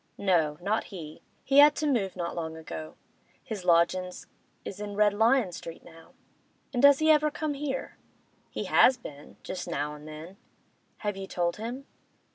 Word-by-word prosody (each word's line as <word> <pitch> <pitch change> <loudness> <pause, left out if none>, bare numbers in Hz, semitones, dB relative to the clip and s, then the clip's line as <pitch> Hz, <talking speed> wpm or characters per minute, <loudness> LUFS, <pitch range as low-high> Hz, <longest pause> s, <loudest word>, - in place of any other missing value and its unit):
No, 165 -6 +1
not 210 +4 0
he. 160 -6 -9 0.2
He 275 +1 +4
had 295 0 +8
to 305 - -2
move 230 -10 0
not 170 -2 -4
long 160 -1 -4
ago; 80 - -8 0.5
his 210 -4 -6
lodgin's 180 +1 +2 0.4
is 195 - -7
in 205 -1 -5
Red 210 0 +4
Lion 225 -1 +3
Street 165 -1 -9
now.' 165 -1 -16 0.6
'And 245 - 0
does 280 0 +8
he 315 +1 +4
ever 305 0 +4
come 300 0 -3
here?' 275 -1 -4 0.5
'He - - -4
has 255 - +5
been—just 175 - -9
now 150 -3 -2
an' 150 0 -11
then.' 155 +5 -10 0.6
'Have 205 -2 -3
you 195 0 -6
told 175 -2 -1
him? 240 +5 -6
195 Hz, 165 wpm, -28 LUFS, 165-250 Hz, 0.6 s, had